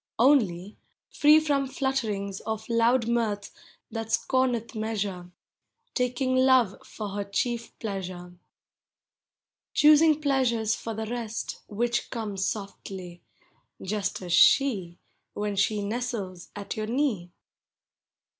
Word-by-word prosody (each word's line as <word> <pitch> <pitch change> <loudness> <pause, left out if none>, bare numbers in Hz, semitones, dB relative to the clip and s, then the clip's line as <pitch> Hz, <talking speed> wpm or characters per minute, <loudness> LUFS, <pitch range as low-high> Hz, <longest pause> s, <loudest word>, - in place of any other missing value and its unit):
Only, 215 -8 +3 0.3
free 300 +1 +6
from 285 -3 0
flutterings 225 -8 -2
Of 220 0 -5
loud 230 +1 +3
mirth 220 -4 -1 0.4
that 225 -1 -5
scorneth 250 -3 +1
measure, 205 -5 -3 0.3
— - - -50
Taking 255 +1 0
hive 255 -6 +4
for 210 -2 -6
her 200 +1 -3
chief 230 +4 -3
pleasure. 185 -4 -6 1.4
Choosing 305 0 +6
pleasures, 250 -7 +1
for 225 -1 -5
the 220 +1 -3
rest, 230 -1 -4
Which 240 +3 -1
come 220 -4 -4
softly,— 195 -2 -5 0.6
just 200 -1 -3
as 175 -1 -3
she, 195 -12 +4 0.4
Wheu 210 -1 -2
she 205 +1 +1
nestles 205 -5 -4
at 205 -1 -5
your 215 0 -3
knee. 235 -8 0
220 Hz, 110 wpm, -27 LUFS, 200-250 Hz, 1.4 s, free